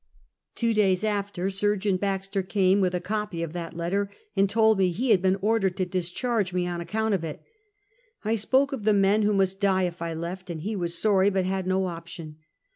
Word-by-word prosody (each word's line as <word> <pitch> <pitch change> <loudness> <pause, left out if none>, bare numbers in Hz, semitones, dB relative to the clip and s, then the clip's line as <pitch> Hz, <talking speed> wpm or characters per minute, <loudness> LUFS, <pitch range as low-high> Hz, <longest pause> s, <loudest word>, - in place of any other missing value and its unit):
Two 230 -1 +1
days 195 -3 +2
after 200 -3 -1
Surgeon 200 0 +1
Baxter 195 0 -2
came, 190 +1 +2
with 180 -1 +1
a - - 0
copy 205 -2 -3
of 165 -1 -5
that 170 -1 -6
letter, 195 +4 -1 0.3
and 195 0 +3
told 220 -1 +3
me 185 -1 +4
he 225 +8 0
had 195 -4 +5
been 190 0 +2
ordered 205 -4 +1
to 185 - 0
dis 180 -1 -2
charge 215 -2 -1
me 180 -1 0
on 175 -1 -3
account 220 +4 -1
of 185 -4 0
it. 155 -2 -6 0.8
I 220 - +1
spoke 265 +6 +2
of 250 -6 -4
the 215 0 +4
men 200 +1 +3
who 210 0 +2
must 195 0 +1
die 190 -2 +2
if 175 -1 -3
I 165 -1 -3
left, 180 +3 -6
and 165 -2 -5
he 210 +6 -3
was 175 -3 -2
sorry 200 -2 +3
but 190 -2 0
had 190 0 -2
no 190 0 +1
option. 165 -3 -7
190 Hz, 215 wpm, -26 LUFS, 180-210 Hz, 0.8 s, had